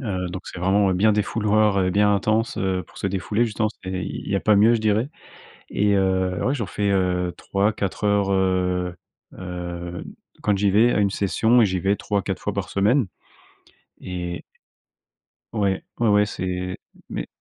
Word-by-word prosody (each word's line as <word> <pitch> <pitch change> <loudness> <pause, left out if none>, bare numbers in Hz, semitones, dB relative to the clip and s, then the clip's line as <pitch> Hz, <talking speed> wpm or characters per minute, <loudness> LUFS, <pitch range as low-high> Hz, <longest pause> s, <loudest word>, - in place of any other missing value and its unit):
Heu, 95 -7 -3
donc 95 +2 -6
c'est 90 - -8
vraiment 95 +1 +3
bien 105 +4 +4
défouloir 105 -1 +2
et 90 - +1
bien 105 +1 +3
intense, 110 +4 0
heu, 95 -2 -1
pour - - -21
se 100 - -1
défouler, 100 +4 0
justement, 110 -1 0
c'est 95 - -5
il - - -6
y 100 - +2
a - - 0
pas 105 - +4
mieux, 110 +4 +6
je 115 - 0
dirais 110 +3 +1 0.6
et 105 0 +2
heu, 95 -1 +1
ouais, 130 - +1
j'en 115 -7 -3
fais, 100 +3 -1
heu, 90 -2 +1
3-4 100 0 -1
heures, 100 -1 +2
heu 90 -1 +1 0.4
heu, 90 -1 -6 0.4
quand 105 -2 +2
j'y 100 0 +2
vais, 115 +5 +4
à - - +1
une 100 -1 +2
session 110 +5 +2
et 110 - +5
j'y 95 -1 -1
vais 95 +3 +2
3-4 100 -1 -2
fois - - -2
par - - -3
semaine. 105 +5 +2 1.0
Et 90 -1 -5 1.1
Ouais. 100 -3 0 0.2
Ouais, 120 - +2
ouais, 105 0 +4
c'est 90 -1 -4 0.3
mais - - -4
100 Hz, 175 wpm, -23 LUFS, 90-105 Hz, 1.1 s, mieux